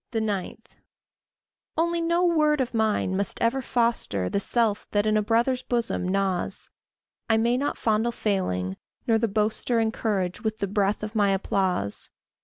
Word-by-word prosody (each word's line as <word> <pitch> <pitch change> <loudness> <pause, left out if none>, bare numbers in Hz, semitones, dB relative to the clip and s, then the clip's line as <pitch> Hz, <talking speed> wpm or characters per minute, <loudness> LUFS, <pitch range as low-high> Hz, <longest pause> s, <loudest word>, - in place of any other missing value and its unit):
9. 215 -5 -2 1.2
Only 340 +1 +1
no 340 +2 +2
word 305 -3 +3
of 255 -2 -1
mine 220 -4 +1
must 200 +1 -1
ever 245 +4 +1
foster 230 - 0
The - - +1
self 220 0 0
that 205 0 +1
in 215 0 +2
a 215 - +3
brother's 235 +4 +1
bosom 235 -7 -1
gnaws; 190 -1 -1 0.6
I 225 - +4
may 235 +2 +2
not 280 +3 -1
fondle 220 +1 +1
failing, 95 - -1 0.3
nor 225 -1 +3
the 230 - +1
boaster 215 +3 0
Encourage 215 -5 -1
with 220 -2 -2
the 200 - -2
breath 200 +1 0
of 215 +1 -4
my 205 -3 +3
applause. 190 - -1
220 Hz, 155 wpm, -26 LUFS, 195-235 Hz, 1.2 s, I